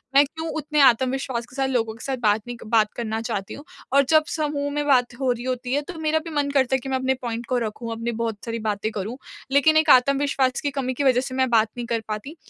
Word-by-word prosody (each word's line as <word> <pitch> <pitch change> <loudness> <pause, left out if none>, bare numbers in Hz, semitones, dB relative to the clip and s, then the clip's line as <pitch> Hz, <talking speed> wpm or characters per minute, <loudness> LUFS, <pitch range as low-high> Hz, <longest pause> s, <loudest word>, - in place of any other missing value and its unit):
मैं 280 - +8
क्यों 320 +3 -7
उतने 300 0 -1
आत्मविश्वास 260 -1 +2
के 250 - -17
साथ 270 -1 0
लोगों 225 -4 0
के 225 - -12
साथ 265 -1 -2
बात 210 0 +3
नहीं 245 - -5
बात 215 -2 +3
करना 225 -2 -3
चाहती 195 -3 -4
हूँ 285 - -10 0.3
और 280 0 +6
जब 310 -1 +5
समूह 290 -2 -2
में 295 0 -1
बात 250 -3 +3
हो 260 -2 +1
रही 240 0 -3
होती 255 0 -3
है 290 - +2
तो 345 - -6
मेरा 315 0 +1
भी - - -5
मन 285 -1 +1
करता 265 -2 +2
है - - 0
कि 270 - -7
मैं 260 - +1
अपने 260 0 +1
पॉइंट 235 -1 -4
को 250 - 0
रखूँ, 230 0 -4
अपनी 230 +1 -3
बहुत 225 -2 -3
सारी 230 0 -3
बातें 215 0 -2
करूँ 215 +5 -5 0.3
लेकिन 310 +3 +4
एक 315 -1 +3
आत्मविश्वास 270 0 +3
की 285 - -1
कमी 260 -2 -2
की 285 - -2
वजह 255 -2 +4
से 260 -1 -6
मैं 260 -1 +2
बात 225 -2 +4
नहीं 240 - -4
कर 230 -2 -1
पाती। 215 +9 -5
255 Hz, 260 wpm, -23 LUFS, 230-280 Hz, 0.3 s, मैं